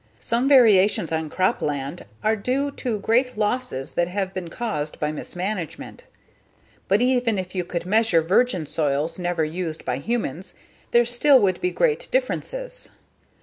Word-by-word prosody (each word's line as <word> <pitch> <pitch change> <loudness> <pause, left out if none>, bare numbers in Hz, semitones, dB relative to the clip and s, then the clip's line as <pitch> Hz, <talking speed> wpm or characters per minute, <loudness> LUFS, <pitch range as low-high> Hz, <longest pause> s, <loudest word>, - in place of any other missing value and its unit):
Some 235 +3 -1
variations 210 - +5
on 160 -1 -2
crop 185 +4 0
land 145 +3 -3 0.2
are 220 +1 +3
due 260 +7 -1
to 245 -5 -3
great 245 +3 +1
losses 210 - -2
that 175 - +1
have 190 +1 -3
been 180 -3 -5
caused 165 -8 -4
by 150 0 -1
mismanagement. 180 +2 -5 0.8
But 205 +5 +3
even 245 -4 +2
if 185 -1 -5
you 185 -2 -1
could 170 0 -4
measure 210 -4 +3
virgin 185 0 +2
soils 150 +2 -1
never 175 -3 0
used 160 0 -5
by 125 0 -1
humans 185 - -3 0.3
there 240 0 +4
still 255 +3 +5
would 190 -2 +1
be 360 - +1
great 455 +4 0
differences. - - -3
195 Hz, 150 wpm, -23 LUFS, 165-240 Hz, 0.8 s, variations